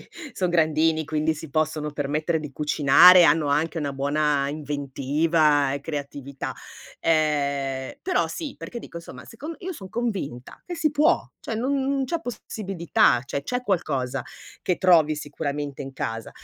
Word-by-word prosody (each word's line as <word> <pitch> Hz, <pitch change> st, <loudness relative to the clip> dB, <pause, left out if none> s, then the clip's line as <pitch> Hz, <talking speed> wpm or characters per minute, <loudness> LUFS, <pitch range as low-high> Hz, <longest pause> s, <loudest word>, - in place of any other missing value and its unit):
sì -, -, -25 dB, 0.2 s
son 180 Hz, -4 st, -1 dB
grandini 160 Hz, -1 st, +2 dB
quindi 155 Hz, +1 st, 0 dB
si 155 Hz, 0 st, -9 dB
possono 155 Hz, 0 st, -1 dB
permettere 150 Hz, +3 st, -1 dB
di 150 Hz, -2 st, -8 dB
cucinare, 150 Hz, +5 st, +7 dB
hanno 150 Hz, -1 st, +3 dB
anche 155 Hz, +3 st, 0 dB
una 145 Hz, -2 st, -2 dB
buona 145 Hz, 0 st, +1 dB
inventiva 145 Hz, 0 st, +1 dB
e 140 Hz, -, -3 dB
creatività. 140 Hz, -2 st, -5 dB, 0.5 s
Ehm, 140 Hz, -4 st, 0 dB
però 370 Hz, 0 st, +1 dB
sì, 310 Hz, -5 st, -5 dB
perché 240 Hz, -, -7 dB
dico 170 Hz, -, -9 dB
insomma, 125 Hz, -6 st, -11 dB
secon 295 Hz, +9 st, -8 dB
io 375 Hz, +1 st, -5 dB
son 190 Hz, -, -10 dB
convinta 190 Hz, -, -4 dB
che 355 Hz, -, -4 dB
si 315 Hz, -2 st, +1 dB
può, 305 Hz, +4 st, +2 dB
cioè 225 Hz, -, -5 dB
non 270 Hz, +5 st, 0 dB
non 275 Hz, 0 st, 0 dB
c'è 335 Hz, +4 st, -2 dB
possibilità, 195 Hz, -, 0 dB
cioè 140 Hz, -, -4 dB
c'è 250 Hz, -, -2 dB
qualcosa 140 Hz, -, -1 dB, 0.4 s
che 180 Hz, -, 0 dB
trovi 160 Hz, -5 st, +4 dB
sicuramente 145 Hz, -1 st, -4 dB
in 135 Hz, 0 st, -8 dB
casa. 115 Hz, -2 st, -4 dB
155 Hz, 155 wpm, -24 LUFS, 140-185 Hz, 0.5 s, cucinare